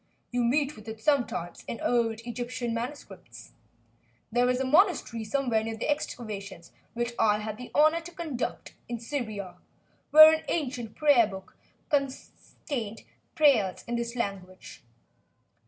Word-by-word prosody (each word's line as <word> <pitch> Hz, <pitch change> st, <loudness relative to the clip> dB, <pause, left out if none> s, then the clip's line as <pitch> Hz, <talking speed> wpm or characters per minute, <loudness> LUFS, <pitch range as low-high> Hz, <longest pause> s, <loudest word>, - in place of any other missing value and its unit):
You 245 Hz, 0 st, 0 dB
meet 280 Hz, +4 st, +1 dB
with 215 Hz, +1 st, -14 dB
it 220 Hz, 0 st, -7 dB
sometimes 235 Hz, -, -1 dB
in 230 Hz, -, -5 dB
old 230 Hz, -2 st, 0 dB
Egyptian 240 Hz, 0 st, -4 dB
manuscripts. 245 Hz, +5 st, -7 dB, 0.8 s
There 245 Hz, +2 st, +3 dB
was 250 Hz, 0 st, +1 dB
a 265 Hz, -, 0 dB
monastery 300 Hz, -, +2 dB
somewhere 225 Hz, -1 st, 0 dB
near 225 Hz, 0 st, -4 dB
the 265 Hz, -, -1 dB
excavations 200 Hz, -, -5 dB, 0.2 s
which 240 Hz, 0 st, -2 dB
I 210 Hz, -2 st, +4 dB
had 215 Hz, 0 st, -5 dB
the 250 Hz, +1 st, -9 dB
honor 310 Hz, +3 st, +4 dB
to 340 Hz, +1 st, -10 dB
conduct 310 Hz, -8 st, -5 dB, 0.2 s
in 240 Hz, -1 st, -3 dB
Syria, 215 Hz, -8 st, -5 dB, 0.5 s
where 310 Hz, +1 st, +10 dB
an 315 Hz, -, -1 dB
ancient 250 Hz, -8 st, -3 dB
prayer 285 Hz, -7 st, +5 dB
book 190 Hz, -2 st, -10 dB, 0.4 s
contained 275 Hz, -2 st, -1 dB, 0.4 s
several 230 Hz, -8 st, -3 dB, 0.4 s
prayers 250 Hz, -, +3 dB
in 240 Hz, -, -2 dB
this 235 Hz, 0 st, -3 dB
language. 195 Hz, -5 st, -5 dB
240 Hz, 140 wpm, -28 LUFS, 220-280 Hz, 0.8 s, where